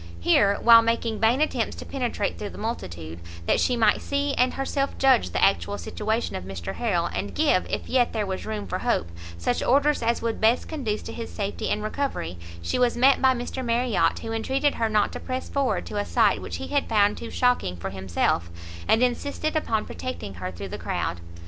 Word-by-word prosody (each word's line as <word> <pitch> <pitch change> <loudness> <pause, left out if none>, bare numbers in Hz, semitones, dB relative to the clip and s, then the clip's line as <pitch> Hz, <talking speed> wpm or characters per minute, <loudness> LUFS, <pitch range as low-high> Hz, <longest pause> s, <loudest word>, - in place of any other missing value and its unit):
Here, 200 - +4
while 230 -1 +9
making 230 -1 -1
vain 230 +6 +3
attempts 310 - 0
to - - -8
penetrate 245 -6 -2
through 205 - -4
the - - -11
multitude, 85 - -5 0.3
that - - +2
she 250 - +2
might 220 -2 +3
see 280 0 -1
and 250 -1 +2
herself 275 +1 -1
judge 265 -3 +4
the - - -1
actual 200 +1 +2
situation 220 +3 -2
of 95 - -4
Mr 95 0 -6
Harrel, 80 - 0
and 100 -2 -4
give, 185 - +2
if - - -3
yet 250 -2 +2
there 215 -2 -1
was 190 -1 -4
room 215 -1 -3
for 185 - -3
hope, 235 - 0 0.3
such 85 +8 -1
orders 285 +3 +3
as 235 0 +1
would 230 -1 -3
best 225 +3 +3
conduce 245 -10 -3
to - - -7
his 230 - -6
safety 200 -1 -3
and 210 - -1
recovery, 215 - -3 0.2
she 85 - -1
was 245 -1 +2
met 270 +3 +5
by 260 -1 +5
Mr 245 +2 -4
Marriot, 240 -1 +1
who 225 - -6
entreated 265 +6 +1
her 225 -1 0
not 215 -1 +2
to - - -5
press 255 0 -4
forward 275 -2 0
to 210 - -5
a 205 - +1
sight 215 - +2
which 90 -2 -5
he 90 0 -6
had - - 0
found 205 -1 +3
too 230 - -7
shocking 245 - +1
for 85 - -5
himself, 95 -2 0 0.4
and 225 +3 +4
insisted 285 +5 -1
upon 225 -8 0
protecting 180 - -6
her 90 0 -5
through 95 +2 -7
the - - -6
crowd. 85 - -3
225 Hz, 210 wpm, -25 LUFS, 185-250 Hz, 0.4 s, while